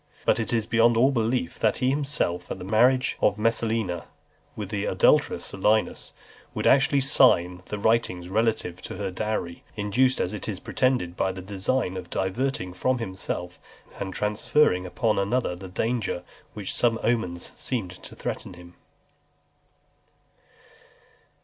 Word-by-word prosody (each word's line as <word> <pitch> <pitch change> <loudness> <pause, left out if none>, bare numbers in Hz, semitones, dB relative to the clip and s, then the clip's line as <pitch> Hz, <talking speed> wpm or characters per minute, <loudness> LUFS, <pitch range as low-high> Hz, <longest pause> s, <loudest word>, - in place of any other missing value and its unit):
But - - +3
it 115 - -2
is 115 -2 +1
beyond 115 +1 +3
all 130 +4 +5
belief, 115 -6 -1
that 110 - +2
he 130 +1 +2
himself, 135 -12 -1
at - - -4
the 90 - -8
marriage 125 +6 +3
of - - +3
Messalina 110 -6 0 0.5
with 105 -3 -5
the 105 -1 -2
adulterous - - +3
Silius, 105 +3 0 0.4
should - - -2
actually 140 0 +4
sign 90 -10 +4
the 105 - -4
writings 100 -5 +1
relative 100 -3 0
to - - -7
her 95 0 -3
dowry; 95 -3 -3
induced, 120 +5 +2
as 90 - -1
it 105 - -4
is 95 -3 -4
pretended, 125 -11 0
by 95 - 0
the 95 0 -8
design 95 +1 -1
of 90 -2 -7
diverting 95 0 -2
from 130 +7 0
himself 95 -4 -4 0.4
and 95 - -3
transferring 105 -1 +1
upon 110 +3 0
another 100 -1 0
the 95 +1 -9
danger 110 -1 -2 0.3
which 105 -3 -3
some 115 -2 +2
omens 90 -8 -1
seemed 110 -9 -3
to - - -11
threaten - - -5
him. 90 0 -14
105 Hz, 145 wpm, -26 LUFS, 90-120 Hz, 0.5 s, all